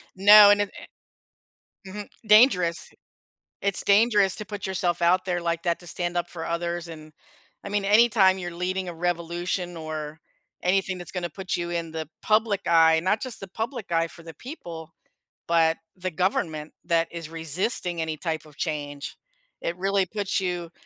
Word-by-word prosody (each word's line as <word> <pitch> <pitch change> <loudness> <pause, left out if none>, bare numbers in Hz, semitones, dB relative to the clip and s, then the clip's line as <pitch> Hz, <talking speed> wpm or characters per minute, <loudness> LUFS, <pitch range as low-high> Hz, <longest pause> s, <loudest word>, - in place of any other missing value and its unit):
No, 205 +1 +9
and 205 0 +5
it, 205 - -2 1.2
eh 190 - -9
Mhm. 210 0 -7 0.2
Dangerous. 200 -6 +4 0.7
It's 200 -2 0
dangerous 205 -2 +4
to 210 - -6
put 200 0 -6
yourself 180 -2 -1
out 180 +2 +3
there 180 -2 -1
like 170 -1 -1
that, 170 -1 0
to 175 - -13
stand 175 +1 -3
up 175 - -1
for 165 -2 -7
others, 170 0 -3
and 155 -1 -11 0.5
I 200 - -6
mean, 205 -1 -1
anytime 210 -3 +5
you're 175 -1 -5
leading 185 +1 -2
a 175 - -6
revolution 175 +1 -2
or 155 -1 -6 0.4
anything 190 0 +1
that's 175 - -7
gonna 175 -2 -3
put 190 +3 -4
you 175 0 -3
in 165 -2 -3
the 160 -1 -5
public 215 -2 +1
eye, 160 -1 +5
not 205 +4 +1
just 255 -3 -5
the 195 - -8
public 225 +1 -5
eye 165 0 +2
for 165 0 -14
the 165 -1 -10
people, 165 - -9 0.5
but 165 -1 +3 0.2
the 185 0 -4
government 160 -3 -1
that 165 -1 +1
is 165 -2 -6
resisting 165 +2 -3
any 160 -1 -2
type 160 0 -3
of 150 -1 -17
change. 145 -3 -4 0.4
It 170 - -2
really 195 0 +1
puts 200 +1 -2
you, 175 -3 -3
175 Hz, 175 wpm, -25 LUFS, 165-195 Hz, 1.2 s, No